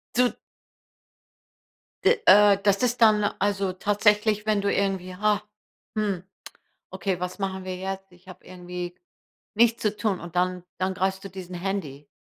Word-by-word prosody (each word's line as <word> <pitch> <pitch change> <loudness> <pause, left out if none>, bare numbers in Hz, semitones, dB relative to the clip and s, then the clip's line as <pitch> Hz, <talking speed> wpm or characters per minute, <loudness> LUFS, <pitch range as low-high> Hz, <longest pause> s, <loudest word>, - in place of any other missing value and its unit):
Du 245 0 +4 1.7
D 485 - +5
äh, 205 -1 +7
das 200 -1 +3
ist 245 0 0
dann 215 -2 +6 0.2
also 195 -1 0
tatsächlich, 210 +2 +2
wenn 215 -2 +1
du 200 - 0
irgendwie: 190 -2 -1
„Hah, 210 +1 +1 0.6
hm, 200 -4 -1 0.7
okay, 190 -3 -2
was 180 +2 -5
machen 190 -1 -3
wir 185 0 -4
jetzt? 195 0 -6
Ich 180 +1 -21
hab 185 - -12
irgendwie 180 -1 -7 0.6
nichts 230 +1 +3
zu 210 -1 0
tun“, 210 -4 -1
und 175 +1 -9
dann 180 0 0
dann 190 0 -1
greifst 190 +1 -1
du 195 - -7
diesen 185 -1 -8
Handy 175 -7 -4
195 Hz, 150 wpm, -25 LUFS, 185-210 Hz, 1.7 s, äh